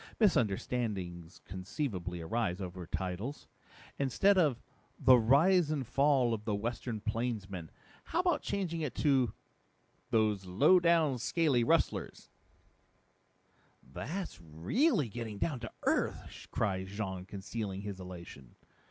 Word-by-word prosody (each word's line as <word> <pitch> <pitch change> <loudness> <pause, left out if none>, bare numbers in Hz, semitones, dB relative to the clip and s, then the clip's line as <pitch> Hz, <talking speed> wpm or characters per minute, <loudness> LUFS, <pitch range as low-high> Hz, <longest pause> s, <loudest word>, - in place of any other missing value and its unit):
Misunderstandings 100 - 0
conceivably 95 - -4
arise 100 +1 -1
over 90 -2 -6
titles. 95 - -4 0.5
Instead 140 +9 +3
of 155 -10 +3 0.4
The 130 - +7
Rise 155 +8 +4
and 145 -4 -1
Fall 135 -1 +3
of 110 -2 -3
the 105 -2 -1
Western 115 +1 -3
Plainsman, 105 -6 -3 0.4
how 345 - 0
about 350 -5 +1
changing 175 -5 -2
it 145 -6 -3
to 135 -7 +3 0.8
Those 110 -5 +2
Lowdown 155 - +4
Scaly 145 -2 +2
Rustlers?" - - 0 1.6
"That's 170 - -5
really 120 - +1
getting 110 -1 -6
down 135 +5 -1
to 115 -2 -7
earth," - - -1
cried 95 -3 -1
Jean, 95 -2 -4
concealing 100 0 -5
his 100 -2 -6
elation. 85 -8 -10
115 Hz, 110 wpm, -32 LUFS, 95-145 Hz, 1.6 s, The